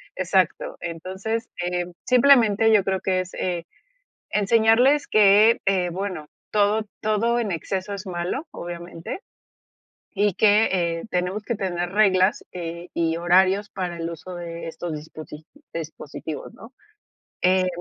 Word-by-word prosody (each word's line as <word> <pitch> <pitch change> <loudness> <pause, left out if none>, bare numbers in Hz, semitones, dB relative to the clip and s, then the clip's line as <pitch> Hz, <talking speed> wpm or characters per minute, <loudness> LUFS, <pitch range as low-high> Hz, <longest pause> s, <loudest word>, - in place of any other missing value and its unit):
exacto. 185 -1 0
Entonces, 190 +7 -4 0.2
eh, 180 0 -1 0.2
simplemente 235 -4 +5
yo 210 -3 +5
creo 190 0 0
que 185 -1 +1
es, 185 - -9
eh, 175 -2 -3 0.6
enseñarles 225 +7 +4
que, 215 +2 +6
eh, 185 -2 +2
bueno, 180 -4 -4 0.2
todo 210 +1 +2
todo 220 +3 +1
en 215 -5 -1
exceso 190 +4 -3
es 195 - -6
malo, 180 - -3
obviamente, 170 - -7 0.9
y 205 -1 +1
que, 215 +3 +4 0.3
eh, - - -8
tenemos 180 +4 -1
que 235 - -2
tener 175 -3 -3
reglas, 195 -2 +3
eh, 170 0 -6
y 165 -1 0
horarios 190 +4 +3
para 180 -3 -4
el 165 0 -3
uso 170 +2 -8
de 170 -1 -6
estos 165 0 -5
disposi 155 0 -9 0.3
dispositivos, 155 -2 -7
¿no? 230 +4 -14 0.7
Eh 185 0 +3
185 Hz, 130 wpm, -23 LUFS, 175-210 Hz, 0.9 s, que